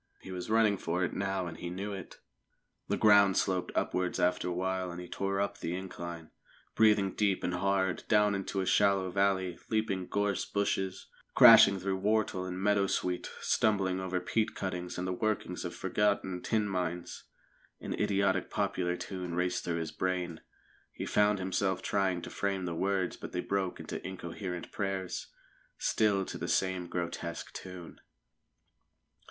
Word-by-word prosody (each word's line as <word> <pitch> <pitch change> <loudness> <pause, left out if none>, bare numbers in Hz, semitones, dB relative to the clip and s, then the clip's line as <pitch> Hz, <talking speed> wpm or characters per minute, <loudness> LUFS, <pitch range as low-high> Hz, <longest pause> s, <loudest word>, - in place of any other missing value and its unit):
He 95 - -9
was 90 0 -5
running 110 -2 +4
for 90 +1 -1
it 90 - -1
now, 95 -1 -1
and 80 -2 -6
he 85 - -5
knew 100 +3 -4
it. 95 -3 -8 0.7
The - - 0
ground 100 -3 +6
sloped 95 -2 0
upwards 90 -1 0
after 90 0 +1
a - - -1
while, 95 +1 -1
and 85 0 -6
he 90 - -7
tore 100 +1 -2
up 100 0 -1
the 85 - -3
incline, 85 -3 -7 0.4
breathing 105 -3 +4
deep 100 -3 +1
and 90 - -1
hard; 95 0 0
down 105 -1 +4
into 95 0 -2
a - - -1
shallow 100 -2 +3
valley, 95 -2 +1
leaping 110 -4 0
gorse 100 -2 0
bushes, 95 -2 -1 0.3
crashing 100 -1 +9
through 95 +1 -1
whortle 100 -2 +1
and 90 0 -4
meadowsweet, 100 -3 +1
stumbling 95 -4 +2
over 95 -1 -1
peat 110 +4 -1
cuttings 90 -2 -4
and 90 - -2
the 90 - -1
workings 110 +2 -2
of - - -5
forgotten 100 -3 0
tin 110 -2 0
mines. 90 -2 -3 0.5
An - - -4
idiotic 100 0 +1
popular 95 -3 -1
tune 90 -3 -5
raced 90 0 0
through 85 -1 -1
his 80 -1 -3
brain. 90 -3 -2 0.5
He - - -5
found 105 0 +3
himself 95 0 -1
trying 95 -3 0
to - - -7
frame 95 -2 -1
the 85 - -2
words, 95 +1 0
but - - -8
they 90 - -1
broke 95 -1 -2
into - - -6
incoherent 90 -1 -6
prayers, 95 -2 -3 0.5
still 100 -3 +2
to - - -6
the - - -3
same 95 -2 0
grotesque 85 -1 -4
tune. 90 -2 -9
95 Hz, 160 wpm, -31 LUFS, 90-100 Hz, 0.7 s, crashing